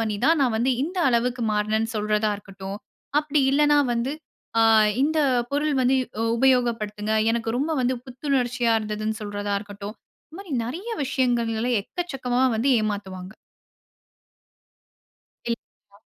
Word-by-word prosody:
பண்ணி 215 -2 -1
தான், 325 0 +4
நான் 245 -4 +2
வந்து 250 +3 +2
இந்த 355 +6 -3
அளவுக்கு 245 0 +1
மாறினேன்னு 215 +2 0
சொல்றதா 210 0 +1
இருக்கட்டும். 195 0 -8 0.4
அப்படி 300 -1 +1
இல்லன்னா, 295 +1 +4 0.2
வந்து 235 +4 -1 0.5
ஆ - - +6 0.4
இந்த 310 +2 +2 0.3
பொருள் 295 +2 0
வந்து 255 +1 +3
இ - - -4 0.3
உபயோக 250 -1 +4
படுத்துங்க, 210 0 -3 0.2
எனக்கு 230 -1 -1
ரொம்ப 295 +5 0
வந்து 255 +1 +1
புத்துணர்ச்சியா 250 -2 0
இருந்ததுன்னு 215 0 -3
சொல்றதா 205 0 -3
இருக்கட்டும். 205 +1 -8 0.3
இந்த 320 - -11
மாரி 380 -6 -9
நெறைய 345 - -5
விஷயங்கள்ல 245 -3 0
எக்கச்சக்கமா 260 - -2
வந்து 265 +5 +2
ஏமாத்துவாங்க. 195 -2 -4 2.2
இல் 230 - -1 0.4
அ. - - -25
235 Hz, 130 wpm, -24 LUFS, 210-270 Hz, 2.2 s, ஆ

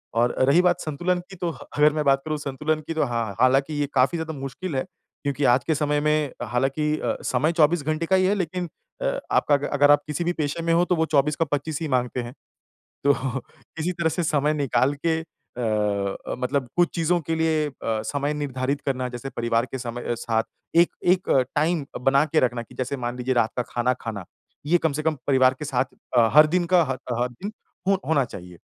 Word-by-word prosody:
और 120 +1 +2
रही 170 +5 +6
बात 180 -1 +2
संतुलन 175 +4 -1
की 190 - -10
तो 175 -1 -2
ह - - -11 0.2
अगर 150 0 +5
मैं 150 -1 0
बात 135 -1 +4
करूँ 155 -1 -2
संतुलन 150 +2 -2
की 165 - -2
तो 160 - +1
हाँ। 115 -5 -2
हालाँकि 135 +4 +3
ये 145 - 0
काफ़ी 135 +6 +3
ज़्यादा 160 0 -4
मुश्किल 135 +5 -5
है। 130 - 0 0.4
क्योंकि 145 0 -1
आज 120 +1 +4
के 160 - +2
समय 150 0 +1
में 150 -2 +1
हालाँकि 135 +6 0
अ, - - -1
समय 155 - +1
24 160 0 +3
घंटे 155 +2 -1
का 190 - +3
ही 185 0 +3
है 200 +2 +2
लेकिन 180 -1 -3 0.3
अ, - - 0
आपका 145 - +3
अ, 145 0 -2
अगर 145 0 +5
आप 145 - +4
किसी 150 +3 -2
भी 175 +1 0
पेशे 150 0 -2
में 165 - +2
हो 175 +1 +4
तो 180 - +1
वो 160 - +1
24 150 -1 +2
का 165 - +1
25 145 +1 -2
ही 160 - -1
माँगते 125 -2 0
हैं। 120 +1 -8 0.7
तो 140 - +6 0.6
किसी 160 +3 -1
तरह 170 -2 0
से 175 +2 -1
समय 150 -2 +1
निकाल 135 -2 +1
के 160 -1 +2
अ, 105 -9 -3
मतलब 130 0 -1
कुछ 175 -1 +4
चीज़ों 170 +1 +1
के 160 - +3
लिए 160 -1 +1
अ, - - -11 0.3
समय 145 +1 -1
निर्धारित 140 -1 -2
करना 130 -2 -1
जैसे 125 +2 -6
परिवार 115 +1 0
के 130 - -6
समय 120 -1 -4
साथ 115 -1 0 0.3
एक 170 +1 +6 0.2
एक 180 +1 +3 0.3
टाइम 155 0 +1 0.2
बना 140 +2 +4
के 155 +1 +2
रखना 120 -1 0
कि - - -16
जैसे 130 +2 -3
मान 120 -1 -4
लीजिए 130 +1 0
रात 115 -2 +2
का 125 - +1
खाना 125 +1 +1
खाना। 110 -5 -5 0.4
ये 175 +3 +4
कम 160 -3 0
से 155 +2 -3
कम 160 0 +1
परिवार 130 -2 +4
के 150 - -5
साथ 130 -3 +1 0.3
अ, 115 -1 +6
हर 155 +1 +9
दिन 175 -1 +2
का 175 - +7
ह - - -4 0.2
ह 120 - -2
हर 125 - 0
दिन 200 - -2 0.4
ह 195 - +5
होना 150 -4 +3
चाहिए। 90 -6 -10
145 Hz, 225 wpm, -24 LUFS, 125-160 Hz, 0.7 s, हर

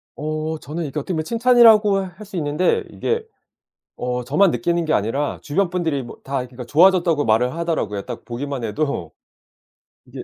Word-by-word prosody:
어 155 +1 -3
저는 160 +3 -5
이게 150 +2 -4
어떻게 165 +6 -4
보면 160 -2 -1
칭찬이라고 230 -1 +5
할 190 +2 -7
수 195 -1 -11
있는데 150 +3 +1
이게 460 0 -2 0.7
어 125 0 -3
저만 165 +9 +3
느끼는 170 -1 0
게 155 - 0
아니라 135 +8 -1
주변 175 +5 0
분들이 165 -7 -1
뭐 120 - -10
다 135 +1 -3
그러니까 125 0 -9
좋아졌다고 170 0 +4
말을 115 +3 +2
하더라고요. 160 -12 -2
딱 - - -8
보기만 130 +1 -5
해도 115 - -2 0.9
이게 - - -9
155 Hz, 370 characters per minute, -21 LUFS, 135-180 Hz, 0.9 s, 칭찬이라고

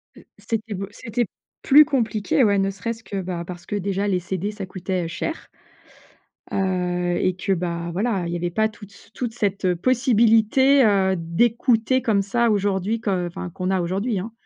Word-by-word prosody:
Heu, - - -16
c'était 215 +1 -4
beau 195 0 -4
c'était 230 +2 -2 0.4
plus 295 +3 +8
compliqué, 245 -3 +1
ouais, 205 -3 +3
ne 195 0 +1
serait-ce 225 +4 -5
que, 195 -3 -4
bah, 175 -2 -4
parce 175 0 -9
que - - -4
déjà 200 0 -1
les 190 -3 +1
CD, 190 +3 -3
ça 210 -2 -6
coûtait, 185 -1 -3
heu, - - -3
cher 320 - -5 1.1
heu 180 -2 0
et 185 - +1
que, 185 +2 -3
bah, 170 -1 -3
voilà, 195 0 -1
il - - -4
y - - -1
avait 175 +1 -2
pas 220 +4 +1
toute 205 -2 -14
c 200 - -18
toute 240 -3 -4
cette 200 -5 0
possibilité, 245 +4 +4
heu, 195 -2 +3
d'écouter 230 +8 +1
comme 210 -5 +2
ça 235 +4 +1
aujourd'hui 205 +2 0
que 185 -5 -1
enfin 175 +1 -6
qu'on 185 +1 -4
a 190 -1 +1
aujourd'hui, 195 +5 -1
hein. 215 +5 -6
200 Hz, 185 wpm, -23 LUFS, 185-225 Hz, 1.1 s, plus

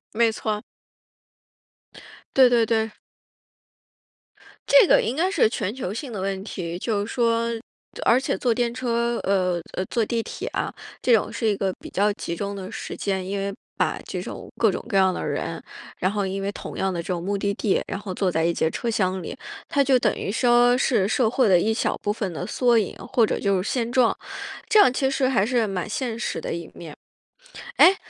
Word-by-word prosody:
没 230 0 +4
错。 215 -1 -3 1.7
对 260 -2 +7
对 235 -2 +4
对。 220 -1 0 1.7
这 - - +7
个 - - +6
应 235 - -2
该 345 +5 +2
是 390 - +3
全 205 -2 -2
球 220 -8 -4
性 250 +3 -5
的 210 - -5
问 195 0 -2
题， 175 -4 -5
就 205 -1 -1
是 225 - -7
说 230 -1 +1 0.5
而 235 - +5
且 270 - -1
坐 245 -2 +1
电 235 0 0
车 235 -1 0
呃， 185 -3 +1
呃， 185 - -2
坐 230 +4 0
地 230 +1 -1
铁 - - -6
啊， - - -3 0.3
这 250 - +3
种 220 - +2
是 230 - -1
一 210 - +2
个 195 -1 -1
比 - - -9
较 205 +2 +2
集 170 -4 -5
中 200 +3 -4
的 190 -1 -7
时 - - -6
间， 190 -2 -2
因 195 +2 -3
为 200 0 -2 0.2
把 - - 0
这 - - -4
种 - - -8
各 - - +4
种 - - -5
各 200 - +1
样 190 -1 +4
的 - - -4
人， - - -3 0.4
然 185 - +1
后 205 -1 -1
因 195 +1 -3
为 200 +1 -2
同 - - -8
样 190 0 0
的 175 - -3
这 - - -11
种 175 -2 -2
目 200 +2 -1
的 200 0 -1
地， 200 0 +1
然 195 - -4
后 200 -2 -6
坐 185 0 0
在 160 -1 0
一 170 - +3
节 165 - 0
车 235 - -3
厢 190 -4 0
里， - - -7 0.3
它 280 - +3
就 265 -2 +4
等 215 -3 +2
于 - - -3
说 240 +2 +4
是 225 -7 +2
社 220 +2 +2
会 250 0 +2
的 185 -3 +5
一 215 +5 +1
小 220 - 0
部 205 - 0
分 205 -3 -3
的 - - -4
缩 245 -2 +2
影， 210 -4 0 0.2
或 245 -3 +5
者 - - -2
就 195 -2 +1
是 190 - -3
现 235 -2 -1
状， 245 -2 +3 0.5
这 430 - +5
样 405 - +7
其 265 +1 0
实 270 -1 +1
还 240 -7 +2
是 235 -1 +1
蛮 190 -2 -3
现 230 +1 -3
实 230 - -3
的 - - -4
一 170 0 -4
面。 160 -3 -10 0.8
哎， 375 - +8
215 Hz, 235 characters per minute, -24 LUFS, 190-240 Hz, 1.7 s, 哎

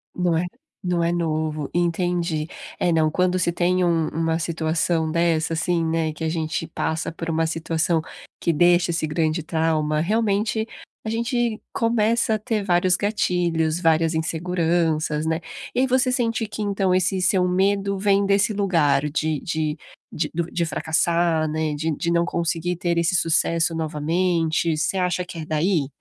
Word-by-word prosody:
Não 175 -2 +1
é, 175 - 0 0.4
não 175 -2 0
é 170 - +1
novo, 155 -3 -2
entendi. 175 -2 0 0.3
É, 175 - +2
não, 160 -1 +3
quando 180 +1 +1
se 170 0 +1
tem 180 +1 +1
um 165 -2 +2
uma 165 +1 -1
situação 160 0 0
dessa, 165 -1 +1
assim, 165 +1 0
né, 160 -1 0
que 160 - -7
a 160 - 0
gente 160 0 -2
passa 160 +1 -2
por 165 0 -6
uma 165 0 +1
situação 165 0 0 0.4
que 170 - +1
deixa 175 +2 +4
esse 165 -2 -1
grande 155 +1 0
trauma, 155 -2 0
realmente, 215 +3 0 0.4
a - - -2
gente 235 0 -1
começa 230 0 +1
a 215 - -3
ter 215 -2 -2
vários 180 -1 +3
gatilhos, 175 -5 0
várias 165 -1 +2
inseguranças, 160 -1 0
né. 160 +1 0 0.3
E 250 - +1
aí, 265 - +3
você 255 0 +2
sente 230 -3 0
que, 215 - -6
então, 195 -2 +1
esse 185 +1 +1
seu 180 0 +3
medo 195 +2 +1
vem 200 0 +2
desse 200 +2 +2
lugar 150 -8 +2
de 155 -1 -1
de 155 -2 -2 0.3
de 160 - -2
do 170 +1 -2
de 170 -1 0
fracassar, 165 0 +1
né, 155 -1 -1
de 160 +2 -1
de 170 - -2
não 170 0 +2
conseguir 170 +1 -1
ter 175 -1 -1
esse 170 +2 +2
sucesso 165 0 +2
novamente, 165 +1 0
você 190 - 0
acha 180 0 0
que 175 - -9
é 155 - -5
daí? 155 -1 +1
170 Hz, 165 wpm, -23 LUFS, 160-185 Hz, 0.4 s, deixa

